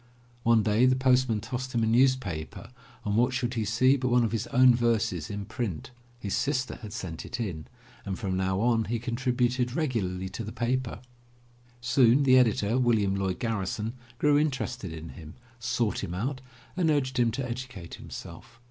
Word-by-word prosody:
One 115 -2 +4
day 110 +4 +4
the 130 - +4
postman 130 -4 +2
tossed 125 +3 -5
him 115 - +2
a - - +3
newspaper 110 -6 +1 0.3
and 105 0 0
what 125 +3 +3
should 120 -1 -1
he 115 -2 -1
see 130 +6 +3
but 130 -1 -2
one 125 0 +4
of 115 - 0
his 115 -2 -2
own 125 0 +6
verses 115 -8 0
in 100 0 -4
print. 110 - -4 0.3
His 100 -4 -2
sister 130 -2 -1
had 105 -3 -8
sent 90 -7 -6
it - - -6
in, 85 -9 -4 0.4
and 95 -2 -4
from 95 0 -2
now 95 +1 0
on 115 -1 +2
he 120 +2 -1
contrib 125 +2 -2
uted 125 0 +1
regularly 100 - -1
to 105 +4 -6
the 110 - -6
paper. 120 0 -2 0.8
Soon 125 +2 +4
the 130 -1 +6
editor, 115 0 +2
William 110 -6 +2
Lloyd 95 -2 -1
Garrison, 110 0 -2 0.2
grew 145 +1 +4
interested 130 - -2
in 80 0 -8
him, 80 -2 -11 0.2
sought 115 -1 -1
him 90 - -4
out, 130 +7 -3 0.3
and 175 -3 +2
urged 130 -4 +1
him 120 -1 +4
to 130 +1 -3
educate 120 -8 -7
himself. 115 +8 -10
115 Hz, 185 wpm, -28 LUFS, 100-130 Hz, 0.8 s, own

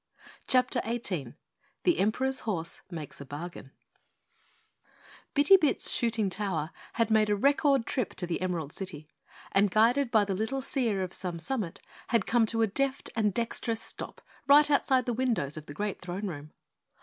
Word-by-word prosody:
CHAPTER 250 -1 +2
18 180 - -2 0.5
The 350 -2 +3
Emperor's 260 +6 +1
Horse 170 -7 -3
Makes 155 -6 -8
a - - -7
Bargain 150 0 -7 1.7
Bitty 295 +7 +7
Bit's 310 -6 +2
shooting 225 -3 +1
tower 185 -5 -2 0.2
had 230 -1 0
made 215 -1 +4
a 205 - +3
record 275 +2 +3
trip 250 -8 -2
to 180 - -1
the 175 0 -3
Emerald 170 -5 -2
City, 155 -6 -7 0.4
and 200 +1 +3
guided 235 +7 +3
by 215 -3 +4
the 195 - -2
little 220 +8 -2
Seer 240 -7 0
of 185 - -5
Some 180 -2 -3
Summit, 200 -1 -3 0.3
had 230 - +1
come 230 -2 +3
to 225 +1 +2
a - - +3
deft 275 +6 -1
and 215 -2 +2
dexterous 230 +1 -1
stop - - -6 0.3
right 295 +1 +7
outside 265 -3 +3
the 245 - -1
windows 230 - 0
of 155 -1 -9
the 145 - -8
great 205 +3 -3
Throne 185 +3 -5
Room. 150 -5 -6
215 Hz, 165 wpm, -29 LUFS, 180-250 Hz, 1.7 s, Bitty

